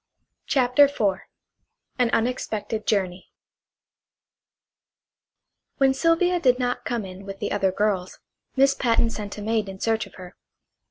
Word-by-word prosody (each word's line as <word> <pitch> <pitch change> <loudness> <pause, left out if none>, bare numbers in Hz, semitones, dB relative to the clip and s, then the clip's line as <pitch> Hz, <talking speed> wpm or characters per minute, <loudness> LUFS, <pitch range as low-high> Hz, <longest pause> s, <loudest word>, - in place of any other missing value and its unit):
CHAPTER 260 +1 +5
IV 205 -9 0 0.8
AN 245 -2 +3
UNEXPECTED 225 -2 -2
JOURNEY 185 -3 -1 2.5
When 270 -1 +4
Sylvia 335 +5 +2
did 255 -6 +3
not 245 -1 -2
come 235 -4 -2
in 185 +1 -10
with 195 0 -7
the - - -4
other 190 -1 +1
girls 190 -2 -1 0.4
Miss 275 0 +4
Patten 230 -3 +1
sent 210 -2 -6
a 210 - -6
maid 220 -2 0
in 190 0 -9
search 225 +1 0
of - - -18
her. 180 -1 -11
225 Hz, 130 wpm, -24 LUFS, 195-255 Hz, 2.5 s, CHAPTER